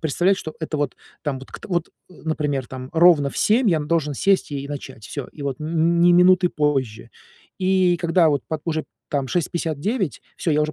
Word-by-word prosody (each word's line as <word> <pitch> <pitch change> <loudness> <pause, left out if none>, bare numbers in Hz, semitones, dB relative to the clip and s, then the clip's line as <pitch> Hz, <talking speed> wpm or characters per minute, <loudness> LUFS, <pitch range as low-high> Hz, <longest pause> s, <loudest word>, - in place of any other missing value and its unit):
представлять, 175 +5 +2
что 155 - -7
это 160 -1 -3
вот, 145 -2 -2 0.3
там 145 -3 -2
вот 135 - -13
кт - - -10
вот, 175 -3 -1 0.2
э, - - -15
например, 150 -5 -1
там 130 +1 -8
ровно 160 -4 +5
в - - -6
7 225 0 +3
я 160 -3 +2
должен 150 -1 0
сесть 195 +1 +1
и 140 0 -4
начать, 130 -6 -8
всё, 140 -3 -5
и - - -13
вот 140 -2 -3
н 165 +2 +1
ни 175 +1 +6
минуты 180 +1 +5
позже. 130 -7 -1 0.5
И, 185 -2 +3
когда, 170 0 +3
вот 145 -4 +1
пот 160 -1 -3
уже, 160 -2 -2 0.2
там, 140 -2 -1
6:59. 170 - -2
Всё 165 - 0
я 150 +1 +3
уже 155 0 -2
155 Hz, 200 wpm, -22 LUFS, 140-175 Hz, 0.5 s, ни